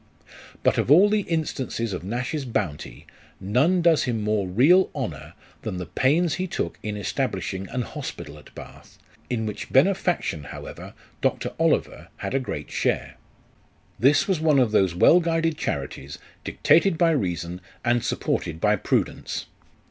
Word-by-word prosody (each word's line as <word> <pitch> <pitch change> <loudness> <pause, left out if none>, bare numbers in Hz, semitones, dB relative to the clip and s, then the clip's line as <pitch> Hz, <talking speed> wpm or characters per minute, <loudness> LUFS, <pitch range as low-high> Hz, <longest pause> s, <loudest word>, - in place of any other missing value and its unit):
But - - +3
of - - 0
all 180 +8 +7
the 215 - +3
instances 135 - -2
of 90 - -5
Nash's 125 - -3
bounty, 85 - -4 0.3
none 135 - +2
does 165 -2 +4
him 115 -4 -2
more 105 -2 0
real 145 - +5
honour - - -5 0.3
than 90 - -4
the 90 - -4
pains 145 - +2
he 185 +4 -2
took - - -4
in 105 -1 -4
establishing 95 -1 -3
an 125 - -2
hospital 75 -8 -7
at - - -18
Bath, - - -12 0.3
in 115 -3 -1
which 105 - -6
benefaction, 170 - +2
however, - - -9 0.3
Dr. - - -1
Oliver - - 0
had - - -4
a 135 - +2
great 130 - -6
share. - - -1 0.8
This 140 +4 +4
was 190 -5 +1
one 155 -2 +3
of 125 -5 +3
those 95 -5 +2
well 165 - +6
guided 165 -1 0
charities, 70 - -4 0.3
dictated 170 +1 +3
by 165 0 +4
reason, 90 - -2 0.2
and 120 0 +2
supported 80 -1 -2
by 105 +3 +3
prudence. - - -1
125 Hz, 150 wpm, -24 LUFS, 95-165 Hz, 0.8 s, all